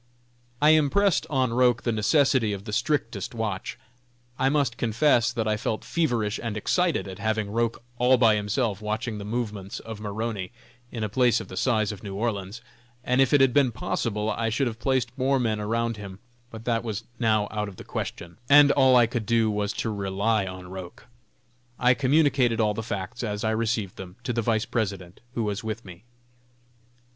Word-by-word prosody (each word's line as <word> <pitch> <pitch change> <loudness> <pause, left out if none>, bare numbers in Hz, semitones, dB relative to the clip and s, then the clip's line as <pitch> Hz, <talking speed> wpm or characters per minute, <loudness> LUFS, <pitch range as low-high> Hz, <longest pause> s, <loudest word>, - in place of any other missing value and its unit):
I 150 +1 +6
impressed 155 +5 +3
on 130 -4 +1
Roch 125 -1 +3
the 120 - 0
necessity 115 0 +2
of 100 0 -7
the 105 - -6
strictest 115 - -1
watch. 110 -1 -3 0.6
I 130 +1 +3
must 140 -4 +1
confess 120 +1 +3
that 115 -2 -2
I 105 0 +1
felt 110 +1 -3
feverish 120 -10 0
and 115 -2 -3
excited 175 - +1
at 95 -1 -8
having 110 -2 -1
Roch 115 +1 0 0.2
all 125 +1 +5
by 115 -3 +5
himself 105 0 -1
watching 110 +1 -3
the - - -6
movements 105 -4 -4
of 110 -2 -8
Maroney, 105 -1 -4 0.4
in 115 -3 -4
a - - 0
place 120 +2 +2
of - - -9
the - - -8
size 110 0 +1
of 105 - -9
New 100 -2 -6
Orleans, 105 0 -3 0.4
and 125 +2 +2
if 135 - +3
it 145 - +5
had 135 -2 +4
been 140 -4 +4
possible 105 -1 -2
I 115 0 -1
should 115 +5 0
have 115 -2 -4
placed 130 -2 0
more 135 +1 +2
men 110 -3 0
around 115 +2 -1
him; 100 -2 -8 0.3
but 115 -1 -10
that 115 -2 0
was 110 -1 -4 0.2
now 110 -3 +2
out 105 -1 -2
of 95 - -12
the - - -10
question, 85 +4 -6
and 145 0 +8
all 130 -2 +5
I 120 -1 +6
could 115 -2 -4
do 115 -2 +3
was 105 0 -1
to 110 - -2
rely 100 +1 0
on 95 -1 -8
Roch. 95 -2 -9 0.7
I 125 0 +4
communicated 135 -3 +2
all 105 -1 +2
the 110 - -4
facts, 100 -4 -5
as 105 -2 -3
I 110 - +1
received 110 -3 -1
them, 90 -1 -9
to 125 - -2
the 115 - 0
Vice 110 -1 0
President, 100 -5 -3 0.2
who 115 - 0
was 105 0 -3
with 110 +1 -5
me. 90 +3 -12
115 Hz, 195 wpm, -26 LUFS, 105-125 Hz, 0.7 s, and